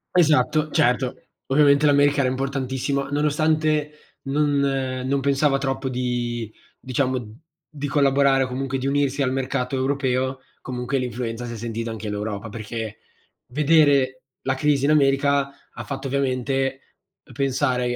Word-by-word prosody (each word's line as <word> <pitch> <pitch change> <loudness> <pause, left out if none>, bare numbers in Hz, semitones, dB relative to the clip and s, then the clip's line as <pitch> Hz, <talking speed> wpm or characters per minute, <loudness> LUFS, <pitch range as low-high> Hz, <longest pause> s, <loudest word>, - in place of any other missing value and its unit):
Esatto, 155 -2 +3
certo. 125 +1 +2 0.3
Ovviamente 140 +1 +4
l'America 145 -1 +4
era 130 - +2
importantissima, 135 +1 -2
nonostante 150 +1 +1 0.3
non 145 +1 +1
non 135 -1 0
pensava 140 +1 +2
troppo 135 0 -2
di 120 -3 -2 0.3
diciamo, 130 -4 -2 0.3
di 145 -1 -5
collaborare 140 -1 +3
o - - -2
comunque 135 +1 -3
di 135 - -2
unirsi 140 0 +1
al 130 -2 +1
mercato 130 0 -2
europeo, 130 -1 0 0.2
comunque 125 +1 -3
l'influenza 120 -2 -3
si 120 - -6
è - - -6
sentita 115 0 -4
anche 110 -1 -6
all'Europa, 105 +1 -4
perché 110 0 -6 0.5
vedere 140 -3 +3 0.2
la 135 0 0
crisi 140 0 +1
in 150 - +3
America, 140 -1 +3 0.2
ha - - -8
fatto 135 0 -5
ovviamente 135 0 -1 0.5
pensare 130 -1 0
135 Hz, 130 wpm, -23 LUFS, 125-140 Hz, 0.5 s, Ovviamente